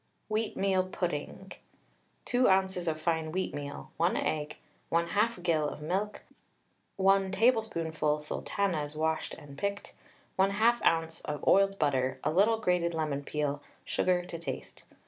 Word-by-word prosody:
WHEATMEAL 195 -3 +1
PUDDING. 180 +1 -4 0.7
2 250 +1 +3
oz. 190 -2 +2
of 155 -1 0
fine 160 -1 0
wheatmeal, 145 -5 -4
1 170 +3 +2
egg, 150 -1 -2 0.3
1/2 180 +4 +1
gill 155 -4 +2
of - - -8
milk, 190 +7 -2 0.7
1 195 0 +3
tablespoonful 170 -9 +1
sultanas 150 0 -2
washed 160 +1 -1
and 140 -1 -12
picked, 200 0 -3 0.5
1/2 215 +5 +3
oz. 165 0 +1
of 150 -2 -4
oiled 195 0 +5
butter, 130 -5 +1
a 150 - +1
little 205 +7 +4
grated 180 -5 +1
lemon 150 -3 -1
peel, 145 -1 -2 0.2
sugar 180 -1 +1
to 170 -2 -7
taste. 145 -5 -6
170 Hz, 125 wpm, -30 LUFS, 155-195 Hz, 0.7 s, oiled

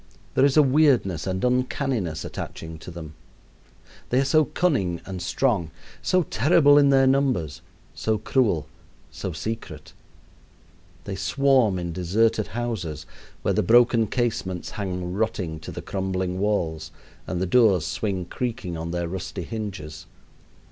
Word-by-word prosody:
There 130 - +3
is 140 +1 +2
a 150 - +8
weirdness 130 - +3
and 95 +4 -1
uncanniness 125 - -1
attaching 80 0 -7
to - - -10
them. 80 -3 -8 1.0
They 125 - +2
are 135 - +2
so 155 +3 +4
cunning 105 - 0
and 95 -2 -6
strong, 95 - 0 0.3
so 185 -1 +2
terrible 145 +1 +5
in 140 -1 +5
their 135 -1 +5
numbers, 130 - +1 0.3
so 110 +8 0
cruel, 105 - +1 0.5
so - - -5
secret. 95 -9 -6 1.1
They 100 - -5
swarm 115 +1 +2
in 85 -1 -4
deserted 105 +5 +1
houses, 105 -11 -4 0.4
where - - +1
the - - +2
broken 120 -1 +4
casements 115 -7 -2
hang 90 -3 -4
rotting 95 -6 -2
to 80 - -8
the - - -7
crumbling 95 -1 -2
walls 80 -6 -1 0.4
and 90 - -2
the 95 - 0
doors 100 -5 +4
swing 95 +2 -2
creaking 110 -6 -4
on 80 +1 -4
their 85 0 -2
rusty 95 +1 -5
hinges. 85 -6 -6
100 Hz, 140 wpm, -24 LUFS, 85-125 Hz, 1.1 s, a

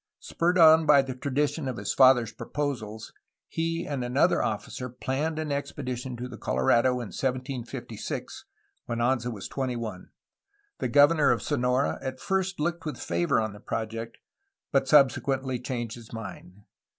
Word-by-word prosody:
Spurred 175 +2 0
on 160 -1 +7
by 140 -2 +7
the 135 -1 -5
tradition 140 +3 -1
of 130 - -3
his 100 - -2
father's 125 -4 +5
proposals, 115 -7 -4 0.3
he 165 +1 -2
and 140 -4 -3
another 135 +8 +2
officer 110 +4 -3
planned 135 +6 -2
an 155 -2 -3
expedition 130 -3 -4
to 125 +1 -5
the 115 -4 -10
Colorado 115 - +2
in 120 -4 -4
1756 125 -3 -4 0.4
(when 120 - -2
Anza 120 0 +1
was 105 -4 -6
twenty 130 -2 -2
one). 110 -6 -6 0.7
The - - 0
governor 145 +1 +5
of 115 -4 +1
Sonora 130 -1 0
at 130 -1 -5
first 190 -1 -1
looked 170 +2 -1
with 150 -5 -4
favor 85 +3 0
on 110 -2 -2
the 105 - -12
project, 115 +1 -4 0.5
but 135 -1 +2
sub 140 -2 +7
sequently 130 -2 -2
changed 120 -3 -3
his 115 -2 -12
mind. 105 -3 -9
130 Hz, 155 wpm, -27 LUFS, 115-145 Hz, 0.7 s, on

